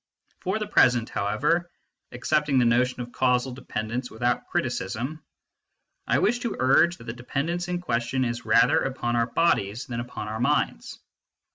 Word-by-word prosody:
For 190 Hz, +3 st, -1 dB
the 215 Hz, -, -3 dB
present, 120 Hz, -, +3 dB
however, 145 Hz, +13 st, 0 dB, 0.4 s
accepting 145 Hz, +3 st, +1 dB
the 125 Hz, -, +4 dB
notion 125 Hz, +2 st, +2 dB
of 120 Hz, 0 st, -7 dB
causal 125 Hz, 0 st, +1 dB
dependence 125 Hz, 0 st, -4 dB
without 120 Hz, +2 st, -1 dB
criticism, 125 Hz, +11 st, -3 dB, 0.8 s
I -, -, +3 dB
wish 240 Hz, -, +2 dB
to 235 Hz, -3 st, -3 dB
urge 155 Hz, +7 st, +4 dB
that -, -, -13 dB
the 115 Hz, 0 st, -5 dB
dependence 155 Hz, +8 st, -3 dB
in 180 Hz, 0 st, -2 dB
question 125 Hz, -3 st, -1 dB
is 120 Hz, 0 st, -3 dB
rather 110 Hz, +1 st, +4 dB
upon 120 Hz, -3 st, -2 dB
our 115 Hz, 0 st, +2 dB
bodies 115 Hz, -7 st, +1 dB
than 120 Hz, -1 st, -5 dB
upon 120 Hz, -3 st, -6 dB
our 110 Hz, +1 st, -4 dB
minds. 125 Hz, -, 0 dB
125 Hz, 155 wpm, -25 LUFS, 115-150 Hz, 0.8 s, the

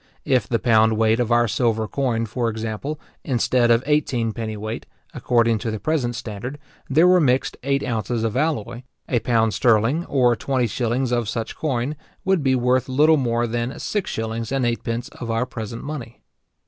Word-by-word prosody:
If 130 Hz, -7 st, +2 dB
in -, -, -20 dB
the 115 Hz, -, +2 dB
pound 110 Hz, -2 st, +3 dB
weight 110 Hz, +1 st, +3 dB
of 120 Hz, -1 st, 0 dB
our 120 Hz, 0 st, +4 dB
silver 110 Hz, 0 st, 0 dB
coin, 120 Hz, -3 st, -1 dB
for 115 Hz, +2 st, -1 dB
example, 110 Hz, +7 st, -4 dB, 0.2 s
instead 125 Hz, -2 st, +2 dB
of 115 Hz, +1 st, +4 dB
eighteen 135 Hz, -6 st, +1 dB
penny 110 Hz, -1 st, -5 dB
weight, 110 Hz, +2 st, -5 dB, 0.3 s
according 115 Hz, -2 st, +2 dB
to 115 Hz, -, -3 dB
the 110 Hz, -1 st, -3 dB
present 120 Hz, -1 st, -1 dB
standard, 120 Hz, +3 st, -6 dB, 0.3 s
there 160 Hz, +6 st, +5 dB
were 180 Hz, 0 st, +6 dB
mixed 130 Hz, -4 st, +1 dB
eight 140 Hz, +1 st, 0 dB
ounces 115 Hz, 0 st, -2 dB
of 115 Hz, 0 st, -1 dB
alloy; 135 Hz, -5 st, -1 dB, 0.3 s
a 120 Hz, -, +1 dB
pound 115 Hz, -2 st, +1 dB
sterling, 120 Hz, +6 st, +2 dB
or 125 Hz, -3 st, +3 dB
twenty 130 Hz, +1 st, 0 dB
shillings 120 Hz, +3 st, -1 dB
of 120 Hz, -3 st, 0 dB
such 115 Hz, 0 st, -4 dB
coin, 140 Hz, -1 st, -2 dB, 0.3 s
would 190 Hz, -3 st, +2 dB
be 135 Hz, -2 st, +2 dB
worth 125 Hz, +1 st, +1 dB
little 155 Hz, +4 st, +4 dB
more 120 Hz, -3 st, 0 dB
than 120 Hz, +2 st, -3 dB
six 205 Hz, -3 st, -2 dB
shillings 115 Hz, +1 st, -3 dB
and 135 Hz, -2 st, +1 dB
eightpence 115 Hz, 0 st, -2 dB
of 120 Hz, -, -8 dB
our 115 Hz, +2 st, 0 dB
present 115 Hz, -2 st, -6 dB
money. 135 Hz, -6 st, -7 dB
120 Hz, 185 wpm, -22 LUFS, 115-130 Hz, 0.3 s, were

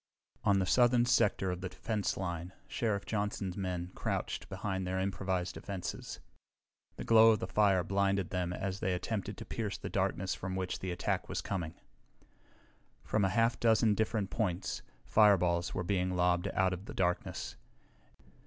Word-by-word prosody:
On 100 Hz, -1 st, +4 dB
the 95 Hz, -, +2 dB
southern 120 Hz, +3 st, +4 dB
sector 100 Hz, -5 st, +2 dB
of 90 Hz, 0 st, -4 dB
the 95 Hz, -, -3 dB
defense 105 Hz, +3 st, -2 dB
line 90 Hz, -1 st, -4 dB
Sheriff 110 Hz, -6 st, -1 dB
Johnson's 100 Hz, -3 st, -2 dB
men 90 Hz, -2 st, -3 dB
crouched -, -, -3 dB
behind 95 Hz, 0 st, -3 dB
their 95 Hz, +1 st, -1 dB
improvised 95 Hz, -1 st, -1 dB
defenses. 95 Hz, -3 st, -5 dB, 0.8 s
The -, -, -6 dB
glow 115 Hz, 0 st, +7 dB
of -, -, +1 dB
the -, -, -2 dB
fire 95 Hz, -1 st, +3 dB
blinded 100 Hz, 0 st, +1 dB
them 90 Hz, -1 st, -1 dB
as 95 Hz, +1 st, -3 dB
they 95 Hz, -1 st, 0 dB
attempted 100 Hz, +1 st, -3 dB
to 115 Hz, -, -7 dB
pierce 105 Hz, -3 st, -3 dB
the -, -, -6 dB
darkness 95 Hz, -1 st, 0 dB
from 95 Hz, 0 st, -4 dB
which 95 Hz, -1 st, -2 dB
the 95 Hz, -, -4 dB
attack 90 Hz, 0 st, -2 dB
was -, -, -2 dB
coming. 85 Hz, -4 st, -3 dB, 1.3 s
From 110 Hz, -, +1 dB
a 95 Hz, -, +3 dB
half 115 Hz, +2 st, +2 dB
dozen 110 Hz, -1 st, +4 dB
different 110 Hz, -1 st, -1 dB
points 95 Hz, -5 st, -1 dB, 0.2 s
fireballs 90 Hz, -5 st, +4 dB
were 95 Hz, -, -1 dB
being 90 Hz, 0 st, 0 dB
lobbed 90 Hz, 0 st, +2 dB
out 95 Hz, 0 st, +1 dB
of 90 Hz, +2 st, -6 dB
the -, -, -8 dB
darkness. 90 Hz, -2 st, -1 dB
95 Hz, 160 wpm, -32 LUFS, 90-105 Hz, 1.3 s, glow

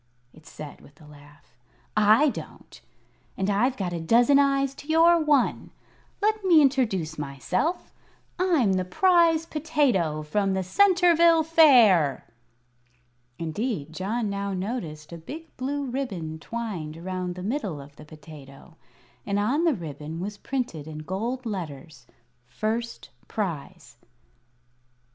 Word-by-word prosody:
it 155 Hz, -, -18 dB
said, 150 Hz, -1 st, -10 dB
with 145 Hz, +1 st, -19 dB
a 155 Hz, -, -16 dB
laugh. 145 Hz, -2 st, -18 dB, 0.4 s
"I 215 Hz, +8 st, +5 dB
don't, -, -, -10 dB, 0.6 s
and 195 Hz, +1 st, 0 dB
I've 250 Hz, +6 st, +1 dB
got 180 Hz, -3 st, -3 dB
a 170 Hz, -, -3 dB
dozen 240 Hz, -, +4 dB
eyes 275 Hz, -1 st, +2 dB
to 290 Hz, -, -17 dB
your 335 Hz, +2 st, +5 dB
one. 290 Hz, -4 st, +1 dB, 0.5 s
Let 430 Hz, 0 st, +1 dB
me 350 Hz, -4 st, +6 dB
introduce 220 Hz, -, +1 dB
myself. 150 Hz, -, -3 dB, 0.5 s
I'm 320 Hz, -, +2 dB
the 185 Hz, -1 st, 0 dB
Prize 330 Hz, -, +3 dB
Potato 275 Hz, -, 0 dB
from 195 Hz, +5 st, 0 dB
the 190 Hz, -, -1 dB
Centerville 340 Hz, -, +4 dB
Fair." 240 Hz, -, +5 dB, 1.1 s
Indeed, 165 Hz, -, -4 dB
John 210 Hz, +6 st, -2 dB
now 200 Hz, 0 st, -3 dB
noticed 180 Hz, -7 st, -5 dB
a 170 Hz, -, -8 dB
big 315 Hz, -, -10 dB
blue 280 Hz, +2 st, -3 dB
ribbon 200 Hz, -12 st, -4 dB
twined 180 Hz, -8 st, -5 dB
around 180 Hz, +1 st, -4 dB
the 180 Hz, -, -7 dB
middle 205 Hz, -, -3 dB
of 140 Hz, +1 st, -13 dB
the -, -, -12 dB
potato, 155 Hz, 0 st, -14 dB, 0.5 s
and 200 Hz, 0 st, -2 dB
on 255 Hz, +11 st, +1 dB
the 320 Hz, -5 st, +3 dB
ribbon 155 Hz, -, -7 dB
was 205 Hz, +3 st, -5 dB
printed 205 Hz, -, -4 dB
in 155 Hz, -1 st, -8 dB
gold 230 Hz, +9 st, -4 dB
letters: 150 Hz, -, -7 dB, 0.4 s
"First 220 Hz, -, -4 dB, 0.2 s
Prize." 170 Hz, -, -5 dB
200 Hz, 130 wpm, -25 LUFS, -, 1.1 s, me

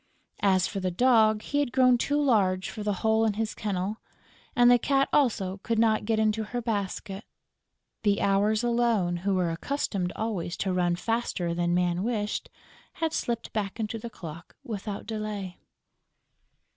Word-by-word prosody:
As 190 Hz, -3 st, +3 dB
for 200 Hz, -, -3 dB
the 185 Hz, -1 st, -1 dB
Dog, 220 Hz, +1 st, +4 dB
he 285 Hz, -, -1 dB
had 285 Hz, -4 st, 0 dB
grown 255 Hz, -1 st, +5 dB
too 285 Hz, +4 st, 0 dB
large 195 Hz, -9 st, +2 dB
for 215 Hz, -, -7 dB
the 210 Hz, 0 st, 0 dB
hole 220 Hz, 0 st, +4 dB
in 220 Hz, -2 st, +2 dB
his 220 Hz, +1 st, -2 dB
kennel; 200 Hz, 0 st, -2 dB, 0.6 s
and 245 Hz, 0 st, +6 dB
the 245 Hz, -, +6 dB
Cat 275 Hz, +2 st, +2 dB
also 200 Hz, -9 st, +2 dB
could 230 Hz, -, -1 dB
not 220 Hz, -1 st, +3 dB
get 225 Hz, 0 st, +1 dB
into 220 Hz, 0 st, +1 dB
her 240 Hz, +3 st, -4 dB
basket. 200 Hz, -3 st, -3 dB, 0.8 s
The 205 Hz, -2 st, +2 dB
Hours 205 Hz, +3 st, +2 dB
alone, 235 Hz, -7 st, +1 dB
who 195 Hz, +2 st, 0 dB
were 180 Hz, -2 st, +1 dB
accustomed 185 Hz, -2 st, -2 dB
always 205 Hz, -6 st, -3 dB
to 190 Hz, -2 st, -1 dB
run 175 Hz, -1 st, +1 dB
faster 210 Hz, -4 st, -1 dB
than 175 Hz, 0 st, 0 dB
Man 175 Hz, 0 st, +1 dB
wished, 210 Hz, -1 st, -2 dB, 0.4 s
had 325 Hz, -1 st, -2 dB
slipped 235 Hz, -1 st, -2 dB
back 210 Hz, 0 st, -3 dB
into 220 Hz, +1 st, -3 dB
the 235 Hz, -, -6 dB
clock 170 Hz, -5 st, -10 dB
without 205 Hz, -2 st, -5 dB
delay. 210 Hz, -4 st, -5 dB
215 Hz, 165 wpm, -27 LUFS, 185-230 Hz, 0.8 s, and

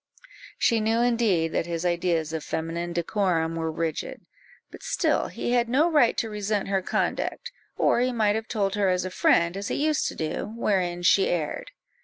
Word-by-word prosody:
She 230 Hz, -, +2 dB
knew 225 Hz, +2 st, +1 dB
indeed 225 Hz, -9 st, +2 dB
that 165 Hz, -, -1 dB
his 170 Hz, 0 st, -3 dB
ideas 170 Hz, -2 st, 0 dB
of 160 Hz, -2 st, -3 dB
feminine 165 Hz, +2 st, -3 dB
decorum 170 Hz, -2 st, 0 dB
were 160 Hz, -1 st, -2 dB
rigid; 160 Hz, -1 st, -4 dB, 0.5 s
but -, -, -12 dB
still -, -, 0 dB
he -, -, -4 dB
had 240 Hz, -1 st, +2 dB
no 300 Hz, +7 st, +3 dB
right 290 Hz, -7 st, +4 dB
to 225 Hz, -, 0 dB
resent 210 Hz, -1 st, -2 dB
her 195 Hz, -1 st, +1 dB
conduct, 185 Hz, -, -2 dB, 0.3 s
or -, -, +3 dB
he 250 Hz, +1 st, +1 dB
might 215 Hz, -4 st, +2 dB
have 220 Hz, +1 st, -3 dB
told 200 Hz, -4 st, -1 dB
her 200 Hz, -2 st, +1 dB
as 180 Hz, 0 st, 0 dB
a 185 Hz, -, -4 dB
friend, 170 Hz, -1 st, +2 dB
as 200 Hz, +1 st, -4 dB
he -, -, -2 dB
used 305 Hz, +1 st, +1 dB
to -, -, -5 dB
do, 160 Hz, +6 st, -3 dB
wherein 180 Hz, -5 st, 0 dB
she 190 Hz, +2 st, +4 dB
erred. 160 Hz, -4 st, -2 dB
195 Hz, 190 wpm, -25 LUFS, 170-225 Hz, 0.5 s, right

